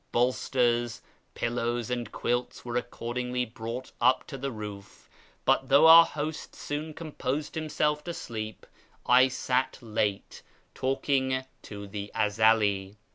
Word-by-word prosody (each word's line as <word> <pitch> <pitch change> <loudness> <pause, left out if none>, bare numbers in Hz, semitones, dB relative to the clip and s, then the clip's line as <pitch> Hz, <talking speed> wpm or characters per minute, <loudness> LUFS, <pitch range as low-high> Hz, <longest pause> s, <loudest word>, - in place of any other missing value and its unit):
Bolsters, 120 -1 +1 0.3
pillows, 120 0 -1
and' 120 -3 -3
quilts 120 +1 -2
were 120 -1 -4
accordingly 125 +1 -2
brought 115 +2 -6
up 130 - +4
on - - -20
to 135 - -6
the 135 +1 -3
roof, 105 -3 -9 0.4
but, 135 - +2
though 140 +3 +7
our 165 +1 +10
host 155 +1 -5
soon 150 +2 -4
composed 150 -2 -3
himself 150 -1 0
to 170 - -3
sleep, 110 -1 -6 0.4
I 125 +1 +6
sat 130 0 -1
late 105 -4 -2 0.3
talking 130 0 0 0.2
to 100 -1 -8
the 100 0 -6
Ezeli. 105 -2 +2
125 Hz, 130 wpm, -28 LUFS, 110-135 Hz, 0.4 s, our